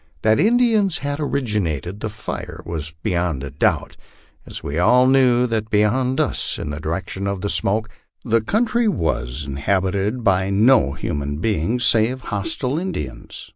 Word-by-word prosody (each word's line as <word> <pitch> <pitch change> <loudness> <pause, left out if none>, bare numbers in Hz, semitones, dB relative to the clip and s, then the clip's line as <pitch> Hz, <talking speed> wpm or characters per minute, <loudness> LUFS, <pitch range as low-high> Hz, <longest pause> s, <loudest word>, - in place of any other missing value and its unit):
That 110 0 +3
Indians 220 -4 +3
had 145 +1 -2
originated 105 - -2
the 110 - -3
fire 105 0 -7
was 80 -2 -4
beyond 85 -6 -1
a 70 - -6
doubt, 70 - 0 0.5
as - - -8
we 75 +4 -3
all 125 +8 +5
knew 130 -2 +4
that 110 -2 -2
beyond 120 +5 +1
us, - - 0
in - - -5
the 75 - -5
direction 95 +5 -4
of 100 -2 -3
the 100 - -2
smoke, 110 +3 0 0.4
the 115 -1 +2
country 230 - +1
was 75 - -1
inhabited 95 - -1
by 95 -2 +2
no 100 - +4
human 70 0 -3
beings 110 +6 0
save 115 +3 +3
hostile 125 +6 -2
Indians. 175 - -6
105 Hz, 150 wpm, -21 LUFS, 85-130 Hz, 0.5 s, all